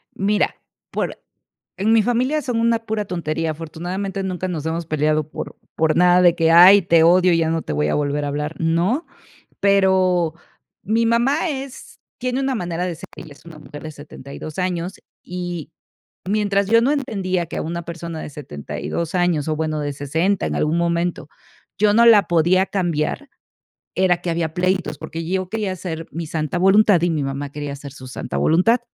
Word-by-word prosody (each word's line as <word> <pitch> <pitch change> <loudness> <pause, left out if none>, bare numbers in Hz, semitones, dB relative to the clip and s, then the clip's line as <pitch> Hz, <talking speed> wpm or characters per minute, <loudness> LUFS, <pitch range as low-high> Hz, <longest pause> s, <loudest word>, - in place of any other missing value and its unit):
Mira, 205 +2 +1 0.4
por - - -3 0.6
en 215 +4 +2
mi 225 - +5
familia 255 +6 +1
son 245 -5 -2
una 230 0 +2
pura 220 -2 -3
tontería, 165 -3 -2
afortunadamente, 175 +5 -5
nunca 185 -1 -3
nos 160 -4 -4
hemos 165 +1 -2
peleado 155 0 0
por - - -7 0.2
por 155 -1 +2
nada 180 +1 +5
de 175 -2 +5
que: 165 -1 +2
"Ay, 185 +4 +9
te 165 -1 +4
odio, 180 +2 +5
y 165 - +3
ya 160 -1 +1
no 165 0 0
te - - -6
voy 150 - 0
a - - 0
volver 145 0 -1
a - - -2
hablar", 150 +2 -3
¿no? 170 - +1 0.6
Pero 185 -4 +3 0.5
mi 225 +3 +1
mamá 260 +9 +2
es 270 -3 -7 0.2
tiene 255 +1 -2
una 270 -1 0
manera 175 -5 -3
de 175 - -3
ser, 190 +4 -10
ella 155 - -10
es 145 - -19
una 160 -2 -11
mujer 145 -1 -11
de 155 - -6
72 145 +1 -10
años, 180 0 -2 0.2
y 175 -3 -6 0.6
mientras 200 -1 +1
yo 230 +2 +5
no 265 - +2
entendía 195 -11 -1
que 165 - -7
a - - -1
una 170 +2 -4
persona 170 -1 -6
de - - -7
72 140 - -5
años, 175 -5 +1
o, 155 - 0
bueno, 155 -1 -2
de 145 -1 -2
60 160 +8 0
en - - -2
algún 155 +2 +1
momento, 170 -2 -1 0.5
yo 205 +1 +3
no 235 +1 +5
la 215 -3 +6
podía 175 +3 +3
cambiar, 175 - -2 0.7
era 185 -2 +3
que 180 - -3
había 165 -1 -2
pleitos, 185 +1 0
porque 165 +1 -6
yo 185 +1 -2
quería 215 -3 -2
hacer 165 -3 -6
mi 165 0 -5
santa 155 +1 -2
voluntad, 195 0 +5
y 175 - +2
mi 155 -2 -1
mamá 135 +1 -4
quería 145 -1 -5
hacer 140 0 -9
su 130 -2 -11
santa 125 - -5
voluntad. 185 +10 +3
175 Hz, 190 wpm, -21 LUFS, 160-200 Hz, 0.7 s, Ay